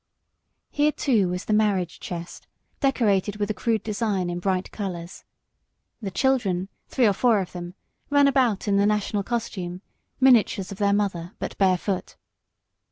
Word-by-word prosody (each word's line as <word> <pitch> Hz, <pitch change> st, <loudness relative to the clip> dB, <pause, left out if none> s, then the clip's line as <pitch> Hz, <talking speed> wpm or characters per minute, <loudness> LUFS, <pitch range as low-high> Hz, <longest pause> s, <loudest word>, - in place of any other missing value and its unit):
Here, 295 Hz, +1 st, +2 dB
too, 230 Hz, -11 st, +2 dB
was 180 Hz, +1 st, -4 dB
the 215 Hz, -, 0 dB
marriage 200 Hz, -5 st, +1 dB
chest, 175 Hz, -1 st, -7 dB, 0.3 s
decorated 210 Hz, -7 st, +1 dB
with 210 Hz, 0 st, -1 dB
a -, -, -1 dB
crude 225 Hz, 0 st, -1 dB
design 205 Hz, -4 st, -1 dB
in 175 Hz, -, -3 dB
bright 185 Hz, 0 st, -1 dB
colours. 180 Hz, -4 st, -6 dB, 0.8 s
The 200 Hz, -, -3 dB
children, 195 Hz, -5 st, 0 dB, 0.2 s
three 255 Hz, -, +2 dB
or 205 Hz, -, +4 dB
four 220 Hz, +2 st, +3 dB
of 185 Hz, -, -4 dB
them, 175 Hz, 0 st, -7 dB, 0.3 s
ran 285 Hz, -1 st, +5 dB
about 250 Hz, -8 st, +2 dB
in 200 Hz, -1 st, +3 dB
the 200 Hz, +1 st, +4 dB
national 210 Hz, -1 st, 0 dB
costume, 190 Hz, -5 st, -4 dB, 0.4 s
miniatures 230 Hz, -7 st, +4 dB
of 195 Hz, -, -8 dB
their 200 Hz, -1 st, +3 dB
mother, 195 Hz, -4 st, -1 dB
but -, -, -5 dB
barefoot. 190 Hz, 0 st, 0 dB
200 Hz, 155 wpm, -25 LUFS, 185-225 Hz, 0.8 s, ran